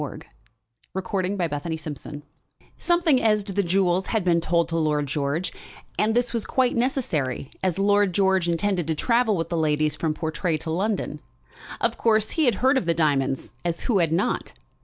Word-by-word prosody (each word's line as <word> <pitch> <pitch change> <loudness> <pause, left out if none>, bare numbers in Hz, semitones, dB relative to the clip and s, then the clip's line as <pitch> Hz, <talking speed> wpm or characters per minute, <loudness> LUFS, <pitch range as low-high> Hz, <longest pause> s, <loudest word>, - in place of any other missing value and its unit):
CHAPTER - - -6 0.7
XLIV 190 0 -1
A - - -1
Midnight 170 -5 -1
Adventure 150 -3 -6 0.6
Something 345 -6 +3
as 210 -2 +2
to 195 -1 -6
the 200 - +2
jewels 185 0 +1
had 220 -4 0
been 170 -2 +2
told 170 0 +1
to 165 - -3
Lord 150 -2 +1
George; 145 +4 -2 0.5
and 220 +1 +2
this 245 0 +1
was 230 -2 -1
quite 255 -2 +1
necessary, 170 - -1
as 185 -2 0
Lord 205 0 +3
George 190 -1 +2
intended 175 -1 0
to 160 - 0
travel 230 +2 +2
with 165 0 -2
the 170 - -1
ladies 155 -1 +1
from 155 -2 -1
Portray 160 +1 -1
to 160 +1 -5
London. 200 +5 -1 0.6
Of - - -1
course, 220 -2 +2
he 320 - +1
had 240 -5 +3
heard 265 0 +5
of 175 - -7
the 170 - +2
diamonds, 135 -6 0
as 170 -1 -2
who 215 -6 +1
had 165 -3 +2
not? 170 +5 -1
180 Hz, 185 wpm, -24 LUFS, 160-210 Hz, 0.7 s, heard